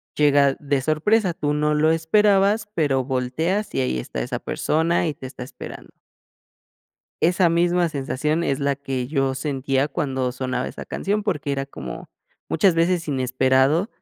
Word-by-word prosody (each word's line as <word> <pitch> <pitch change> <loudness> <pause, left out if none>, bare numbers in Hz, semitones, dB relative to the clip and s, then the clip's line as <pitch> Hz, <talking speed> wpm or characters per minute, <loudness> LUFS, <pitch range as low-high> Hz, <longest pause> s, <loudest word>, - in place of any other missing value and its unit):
llega 145 -2 +4
de 140 -2 0
sorpresa. 175 - +2
Tú 150 -2 -1
no 150 0 +1
lo 155 +1 +3
esperabas, 200 +5 +3
pero 140 -7 +1
volteas 155 +11 -1
y 135 - +1
ahí 65 - -1
está 60 0 -5
esa - - -3
persona 165 +2 0
y 155 - -1
te 130 - -9
está 125 -1 -8
esperando. 130 - -10 1.3
Esa 175 +1 +4
misma 175 +1 +2
sensación 150 +2 -1
es 140 -5 0
la 140 0 +1
que 135 -2 -4
yo 135 -2 0
sentía 135 0 -1
cuando 135 -4 -2
sonaba 130 0 -3
esa - - -8
canción, 205 +2 -2
porque 150 -8 -2
era 135 0 -2
como, 65 - -8 0.4
muchas 170 +2 +3
veces 170 0 +1
inesperado 130 - +2
150 Hz, 155 wpm, -22 LUFS, 130-170 Hz, 1.3 s, llega